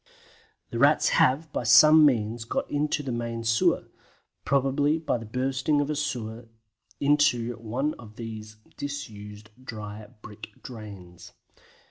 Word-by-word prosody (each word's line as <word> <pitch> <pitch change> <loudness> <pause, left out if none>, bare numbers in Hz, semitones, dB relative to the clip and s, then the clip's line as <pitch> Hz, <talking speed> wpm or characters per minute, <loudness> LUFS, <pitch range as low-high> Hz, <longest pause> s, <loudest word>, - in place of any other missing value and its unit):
The 115 - -3
Rats 145 +4 +4
have, 145 +4 +2
by - - -1
some 155 0 +7
means, 115 -3 -1
got 115 - -4
out 150 +1 0
of 145 - -7
the 130 - -3
main 115 -1 -4
sewer, 115 0 +2 0.6
probably 140 +3 +2
by 155 -6 -2
the 115 - -9
bursting 130 +5 0
of 145 +1 -1
a - - -2
sewer 120 -6 -4 0.5
into 140 -5 +2
one 120 +7 -2
of 110 -2 -13
these 110 -2 -8 0.2
disused 110 -7 -7
dry 105 -3 -8 0.2
brick 105 0 -11
drains. 95 -7 -11
120 Hz, 135 wpm, -26 LUFS, 110-145 Hz, 0.6 s, some